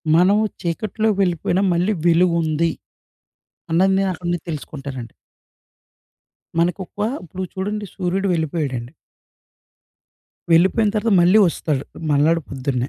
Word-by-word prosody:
మనము 195 +5 +4 0.2
చీకట్లోకి 210 +4 -1
వెళ్ళిపోయినా 180 0 +1
మళ్ళీ 180 +5 +1
వెలుగుంది. 170 -2 +2 1.0
అన్నది 190 +4 +3
నేనక్కడి 185 -2 -2
నుండి 175 0 0
తెలుసుకుంటానండి. 135 -5 -6 1.5
మనకు 170 +2 +1
ఒక, - - -38 0.3
ఇప్పుడు 185 +3 -7
చూడండి 205 +2 -3
సూర్యుడు 190 +1 -1
వెళ్ళిపోయాడండి. 145 -7 -2 1.6
వెళ్ళిపోయిన 190 +6 +4
తర్వాత 215 +1 +1
మళ్ళీ 180 +5 +5
వస్తాడు. 150 -4 -2 0.3
మర్నాడు 155 +4 +3
పొద్దున్నే. 130 -1 -2
170 Hz, 100 wpm, -21 LUFS, 155-190 Hz, 1.6 s, మళ్ళీ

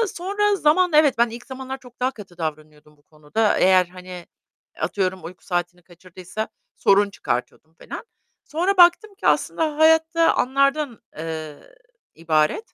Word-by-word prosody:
sonra 405 +3 0
zaman 360 +1 +3
Evet, 300 -5 +4
ben 235 0 +3
ilk 240 +2 -10
zamanlar 265 0 -7
çok 250 -2 -18
daha 255 +1 +1
katı 195 -7 -13
davranıyordum 150 -1 -7
bu 145 - -31
konuda 155 +9 -1
eğer, 185 -1 +5
hani, 180 -1 -10 0.5
atıyorum 190 -2 -2
uyku 175 +2 -11
saatini 175 0 -3
kaçırdıysa 185 +4 -8 0.3
sorun 200 +1 +3
çıkartıyordum 155 0 -5
falan. 465 - -9 0.4
Sonra 360 +5 -1
baktım 365 +4 +5
ki - - -2
aslında 310 -2 0
hayat 320 +1 +4
da 330 0 +4
anlardan, 275 -1 +1 0.2
eee, 155 -2 -6 0.6
ibaret. 160 - 0
210 Hz, 140 wpm, -22 LUFS, -, 0.6 s, eğer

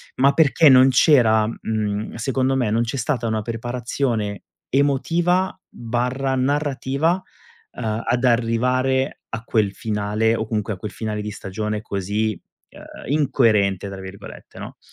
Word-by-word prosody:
ma 140 +2 +4
perché 155 +1 +4
non 130 0 +7
c'era, 120 -6 +4
mhmm, 110 -2 -3
secondo 130 +3 0
me, 125 -5 0
non 115 +2 +2
c'è 120 +3 -4
stata 120 -2 -1
una 110 -1 -1
preparazione 115 -1 -3 0.3
emotiva/narrativa, 140 -2 0 0.6
uhm, 110 0 -3
ad 120 +1 0
arrivare 125 +3 +1
a 115 0 -5
quel 105 -3 +1
finale, 105 +1 0
o 110 - -2
comunque 110 -1 -2
a 95 - -8
quel 105 +3 -6
finale 105 -1 -4
di 105 - -4
stagione 105 +2 -4
così, 105 0 -2 0.3
uhm, 135 - -10
"incoerente" 105 -10 +2
tra 95 -1 -8
virgolette, 95 +1 -11
no. - - -9
115 Hz, 130 wpm, -21 LUFS, 105-135 Hz, 0.6 s, non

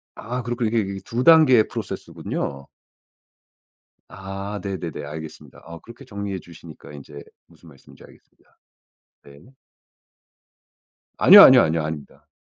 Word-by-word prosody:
아. 125 +3 -6
그렇군요. 120 -1 -3
이게 115 +1 0
이게 100 -1 -5
2 120 +2 -4
단계의 155 -9 +5
프로세스군요. 70 -1 -7 1.4
아. 95 +2 -8
네네네. 95 -5 -6
알겠습니다. 80 +2 -11
아 85 0 -11
그렇게 120 +4 -16
정리해 100 -4 -7
주시니까 85 -3 -15
인제 70 0 -12 0.3
무슨 85 - -20
말씀인지 70 -3 -19
알겠습니다. - - -24 0.7
네. 70 - -19 1.6
아니요, - - +8
아니요, - - +8
아니요. 80 0 -1
아닙니다. 75 -2 -9
95 Hz, 315 characters per minute, -21 LUFS, 80-115 Hz, 1.6 s, 아니요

